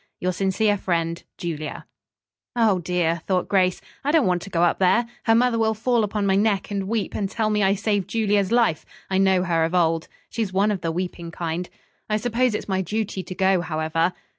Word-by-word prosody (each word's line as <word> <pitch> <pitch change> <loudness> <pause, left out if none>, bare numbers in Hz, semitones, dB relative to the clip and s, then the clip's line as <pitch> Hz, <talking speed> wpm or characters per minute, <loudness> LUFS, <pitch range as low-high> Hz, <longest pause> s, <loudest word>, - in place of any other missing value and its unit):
"Your 185 - 0
sincere 195 +3 +1
friend, 170 -2 -1 0.2
"JULIA" 155 -3 -5 0.7
"Oh, 220 -6 +3
dear!" 170 -1 0
thought 185 -2 +1
Grace. 185 -2 +2 0.2
"I 280 - -1
don't 315 -2 +4
want 180 -2 +1
to 195 - -8
go 170 -2 +1
up 175 - +2
there. 195 +6 +3 0.2
Her 225 -1 +5
mother 240 0 +3
will 220 0 +2
fall 235 +1 +1
upon 210 0 -1
my 190 -1 +3
neck 205 -1 +1
and 195 -1 -2
weep, 220 -1 -2
and 200 -2 -2
tell 215 0 -1
me 210 0 +1
I 195 0 +3
saved 205 -2 -1
Julia's 205 -3 +1
life. 230 -10 +2 0.3
I 190 - +2
know 190 -2 +3
her 165 -2 +1
of 165 +3 -1
old. 165 -2 +2 0.2
She's 220 -4 -3
one 200 +3 +2
of 195 -3 -3
the 165 -1 -1
weeping 175 0 -4
kind. 170 +1 -4 0.4
I 215 - +2
suppose 240 +1 +1
it's - - -4
my 190 -1 0
duty 205 +1 -3
to 185 +1 -8
go, 190 -1 +3
however." 165 +1 0
190 Hz, 210 wpm, -23 LUFS, 175-215 Hz, 0.7 s, Her